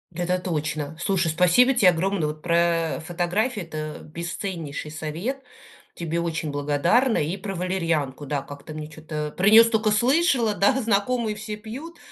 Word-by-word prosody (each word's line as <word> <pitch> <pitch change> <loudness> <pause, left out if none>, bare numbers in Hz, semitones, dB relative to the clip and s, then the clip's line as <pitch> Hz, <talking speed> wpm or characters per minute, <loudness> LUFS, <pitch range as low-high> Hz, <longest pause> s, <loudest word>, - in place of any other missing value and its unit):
Это 180 +1 0
точно! 155 -3 -3
Слушай, 185 0 +1
спасибо 180 +11 +4
те 225 -8 +5
огромное, 180 -1 0
вот 155 0 -6
про, 170 0 0 0.4
э, - - -7
фотографии- 180 +8 -1
это 155 -2 -6
бесценнейший 170 -2 -5
совет! 170 - -4 0.5
Тебе 170 0 -2
очень 160 -2 -2
благодарна 150 - +2
и 160 +6 -1
про 195 0 -5
валерьянку, 165 -6 -1
да. 145 0 -1
Как-то 145 +2 -10
мне 155 -1 -6
чё-то 155 -1 -6
про 195 +2 +3
нее 225 +2 +9
столько 220 -2 +1
слышала, 245 0 +3
да, 205 +7 +3
знакомые 220 +1 0
все 210 0 -6
пьют. 265 +11 -9
175 Hz, 155 wpm, -24 LUFS, 155-215 Hz, 0.5 s, нее